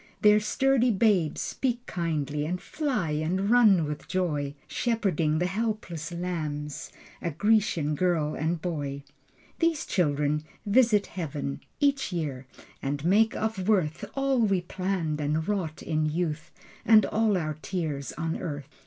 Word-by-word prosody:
Their 210 0 +7
sturdy 255 +3 +2
babes 195 -7 +2
speak 245 -2 -2
kindly 150 -4 -2
And 175 +4 -2
fly 260 - -2
and 175 +7 0
run 210 -9 +6
with 150 0 -5
joy, 150 -6 -1
Shepherding 190 -10 0
the 175 - +1
helpless 190 -5 -3
lambs 155 -5 -4 0.3
A 170 - -1
Grecian 200 -3 +2
girl 155 -2 +1
and 160 +2 -1
boy. 145 -4 -4 0.6
These 330 -2 +1
children 150 -3 +1 0.2
visit 210 -1 +4
Heaven 145 -5 -4 0.2
Each 280 -6 +2
year 140 -7 -3 0.3
and 145 +2 -3
make 215 +5 +4
of 220 -3 -2
worth 170 -8 +1
All 275 -1 +1
we 195 -5 +2
planned 175 -4 -2
and 155 +2 0
wrought 185 -7 -2
in 155 -1 0
youth 155 -1 -2 0.3
And 215 -2 +6
all 215 -2 +2
our 155 -3 -3
tears 155 -8 -3
on 165 -1 -2
earth. 145 -5 -5
175 Hz, 135 wpm, -27 LUFS, 150-210 Hz, 0.6 s, Their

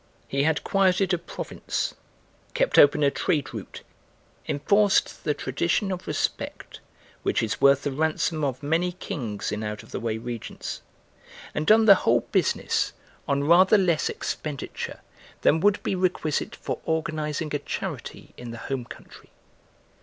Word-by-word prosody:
He 140 - 0
had 155 +1 +1
quieted 190 -1 +2
a 175 - +1
province, - - -4 0.6
kept - - +3
open 145 +1 +6
a 140 - +4
trade 150 0 -1
route, - - -8 0.6
enforced 200 +7 +2
the 150 - +1
tradition 170 +9 0
of 185 -1 -5
respect - - -3 0.4
which - - 0
is 110 - -2
worth 140 0 +5
the 145 - -1
ransom 155 +2 0
of 135 -1 -2
many 170 +4 +1
kings 130 - -4
in 105 - -3
out 105 -1 -4
of - - -17
the - - -3
way 110 -1 -2
regions, 120 0 -6 0.7
and 150 - -2
done 220 +1 +6
the 200 - +10
whole 120 +1 +3
business - - +1 0.3
on 140 0 +1
rather 180 +7 +6
less 175 -5 +2
expenditure 150 -3 -5 0.4
than 160 - +4
would 205 +3 +4
be - - -1
requisite 180 -5 -1
for - - -4
organising 155 -1 -2
a 145 - 0
charity - - -6
in 120 - -8
the 115 - -7
home 130 +1 -4
country. - - -13
150 Hz, 150 wpm, -25 LUFS, 135-180 Hz, 0.7 s, the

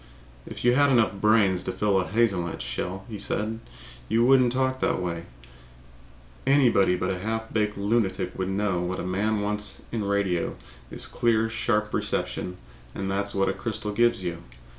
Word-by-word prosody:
"If - - -7
you 120 - +5
had 145 +2 +4
enough 115 -5 +3
brains 105 -4 +4
to - - -1
fill 95 +1 +1
a 90 - -4
hazelnut 95 -6 0
shell," 90 +10 -4
he 110 -3 -7
said, 110 +2 -2 0.5
"you 115 +1 +3
wouldn't 130 -2 +5
talk 130 +1 0
that - - +1
way. 85 -2 -3 1.2
Anybody 120 -10 +4
but 90 +1 -1
a 90 - -3
half 110 +2 -3
baked 105 -2 0
lunatic 100 -3 0
would 95 0 -2
know 95 -2 0
that 90 - -2
what 90 +1 -3
a - - -3
man 105 +4 0
wants 105 0 -2
in 115 -3 -2
radio 100 -4 0 0.3
is - - -6
clear, 115 -1 +1
sharp 105 -2 0
reception 90 0 -2 0.4
and 95 0 -3
that's 100 +1 -1
what 95 0 +2
a - - +1
crystal 110 -2 -3
gives 120 -3 +2
you. 85 -2 -3
105 Hz, 175 wpm, -26 LUFS, 95-115 Hz, 1.2 s, you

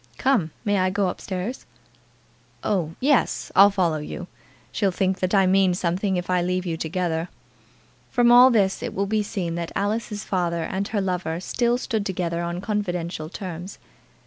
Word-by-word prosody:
Come; 255 -12 +2 0.2
may 205 -1 +2
I 185 0 +2
go 195 0 0
up - - -7
stairs?" 190 +6 -5 1.0
"Oh, 170 -5 -1
yes. 275 0 +1
I'll 200 +1 +8
follow 175 -6 0
you. 165 +4 -6 0.5
She'll 200 -2 +1
think 190 0 0
that 185 +2 0
I 195 -1 +5
mean 190 -1 +3
something 185 +2 0
if 180 - -3
I 180 -1 +2
leave 180 +1 -1
you 170 -2 -2
together." 165 +1 -2 0.8
From 240 -1 +4
all 245 +2 +9
this 200 -6 +2
it - - -5
will 200 - 0
be 215 +1 +1
seen 190 -5 -3
that 170 - -5
Alice's 210 +1 -2
father 170 -3 -1
and 195 +3 -2
her 215 -2 -1
lover 180 -3 -2
still 240 +6 0
stood 225 -4 -2
together 175 -3 -2
on 175 +1 -3
confidential 180 -6 -3
terms. 180 0 -7
185 Hz, 175 wpm, -24 LUFS, 175-205 Hz, 1.0 s, all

